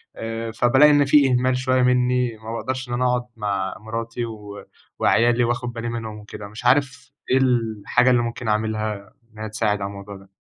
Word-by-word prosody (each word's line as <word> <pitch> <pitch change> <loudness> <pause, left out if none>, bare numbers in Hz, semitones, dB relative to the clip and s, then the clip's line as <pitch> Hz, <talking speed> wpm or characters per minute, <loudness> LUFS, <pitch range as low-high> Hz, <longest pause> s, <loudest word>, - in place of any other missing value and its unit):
آآ، 115 0 -5
فبالاقي 130 +6 +5
إن 145 -1 +4
في 140 -1 +5
إهمال 125 +1 +2
شوية 130 0 +1
مني 125 -1 +1
وما 110 +1 -8
باقدرش 130 +2 -4
إن - - -3
أنا 125 +1 0
أقعد 125 -1 +1
مع 100 -3 -2
مراتي 115 +2 -4
و 105 -3 -9 0.3
وعيالي 120 +1 +3
وآخد 120 +1 -2
بالي 115 0 -4
منهم 110 -2 -5
وكده. 105 0 -9
مش 110 +4 -11
عارف 130 0 +1 0.2
إيه 130 - +5
الحاجة 120 -2 +1
اللي 120 -1 +3
ممكن 120 0 -5
أعملها، 110 -2 -2 0.2
إنها 110 0 -6
تساعد 105 -1 -1
على 100 - -2
الموضوع 100 0 -9
ده؟ 95 0 -18
115 Hz, 185 wpm, -22 LUFS, 110-125 Hz, 0.3 s, فبالاقي